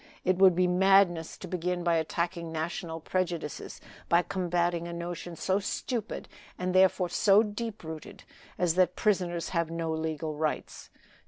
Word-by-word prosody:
It 185 0 +2
would 190 -2 +7
be 185 +1 +3
madness 180 -2 +3
to 185 - -8
begin 180 0 -2
by 170 -1 +3
attacking 170 +1 -2
national 165 0 -4
prejudices, 170 -4 -3 0.3
by 170 +1 +4
combating 175 -2 -1
a 170 - -6
notion 170 0 -5
so 190 +4 0
stupid, 225 +2 -3 0.3
and 180 0 -2
therefore 185 -1 +4
so 200 +4 +5
deep 215 0 -5
rooted, 160 -1 -8 0.3
as 175 -2 +2
that 180 0 +3
prisoners 180 -5 0
have 170 -2 0
no 165 -1 -2
legal 160 -1 -2
rights. 155 0 -3
175 Hz, 150 wpm, -29 LUFS, 165-185 Hz, 0.3 s, would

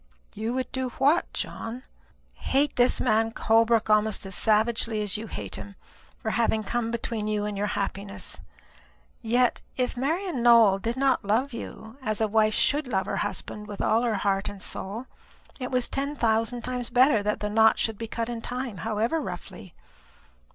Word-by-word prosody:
"You 225 +3 -3
would 260 0 -2
do 260 -1 -2
what, 290 +6 +3
John?" 240 +3 -5 0.5
"Hate 280 +1 +1
this 245 +1 +4
man 225 -1 +2
Holbrook 225 0 +3
almost 215 -1 +2
as 195 - -5
savagely 220 +1 +2
as 205 -2 0
you 220 +1 -4
hate - - -5
him, 200 0 -9 0.4
for 220 - -3
having 220 -2 +1
come 235 +2 -1
between 230 -2 -3
you 210 -1 0
and 210 -1 -3
your 205 +1 -1
happiness. 200 0 -3 0.8
Yet, 240 +2 +2 0.2
if 250 0 0
Marian 315 +3 -1
Nowell 230 -5 +6
did 230 +5 -3
not 270 -2 +2
love 235 +7 +1
you 225 0 -8
as 215 -4 -2
a 220 - +2
wife 215 0 +2
should 290 -1 +2
love 190 -5 0
her - - -2
husband, 210 +1 -4
with 205 -1 -8
all 225 - +2
her 235 -3 +1
heart 195 0 0
and 205 - -9
soul 205 +5 -4 0.5
it 255 - -3
was 250 -1 +1
ten 280 +2 -3
thousand 230 0 0
times 250 -1 -3
better 250 -2 +4
that 210 +1 -1
the 210 - -2
knot 220 +1 +5
should 220 -2 -1
be 230 - -4
cut 230 +1 -3
in 235 -1 -4
time, 250 -3 -4
however 225 - -1
roughly. 185 - -8
225 Hz, 180 wpm, -26 LUFS, 210-250 Hz, 0.8 s, Nowell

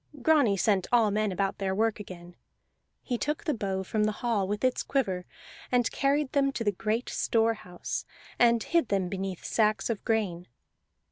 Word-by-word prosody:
Grani 280 -10 +4
sent 195 -1 +2
all 230 -4 +4
men 215 0 0
about 195 +1 -1
their 190 -1 -1
work 220 +1 +1
again; 175 -3 -10 0.7
he 245 -3 -2
took 300 +1 -2
the 310 - 0
bow 195 -5 -2
from 210 +3 0
the 215 - +1
hall, 210 -5 +1
with 205 +3 -3
its 255 -1 +2
quiver, 190 -10 -1 0.4
and 245 -2 +2
carried 280 0 +1
them 275 -1 +2
to 230 - -3
the 205 - +2
great 215 +5 -2
store 225 0 +1
house, 180 -5 -6 0.4
and 235 -2 +4
hid 335 -7 +1
them 190 -3 0
beneath 190 -1 -4
sacks 215 0 +1
of 220 - -4
grain. 200 -7 -1
215 Hz, 180 wpm, -28 LUFS, 195-240 Hz, 0.7 s, Grani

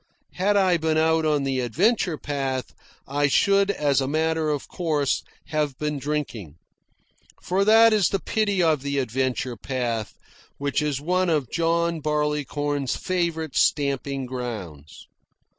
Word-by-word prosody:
Had 205 +3 +1
I 185 -3 +3
been 160 -1 0
out 160 0 +2
on 150 -2 +1
the 135 -1 -1
adventure 170 - +1
path, 135 -5 -3 0.3
I 145 +1 +1
should 200 +7 +3
as 145 -8 +1
a 135 - -1
matter 160 +1 0
of 145 -2 -2
course 150 -6 0 0.3
have 150 -4 -1
been 150 -1 -2
drinking. 130 - -4 0.9
For 190 +2 +1
that 225 +2 +6
is 205 -5 +3
the 195 - 0
pity 205 -1 0
of 155 -4 +2
the 140 0 -2
adventure 130 0 -1
path, 115 -2 -3 0.4
which 140 +1 -1
is 150 -3 -1
one 180 +4 0
of 150 -7 0
John 170 0 +1
Barleycorn's 145 -2 -1
favourite 170 -4 -2
stamping 140 -2 +1
grounds. 105 - -7
150 Hz, 140 wpm, -24 LUFS, 135-170 Hz, 0.9 s, that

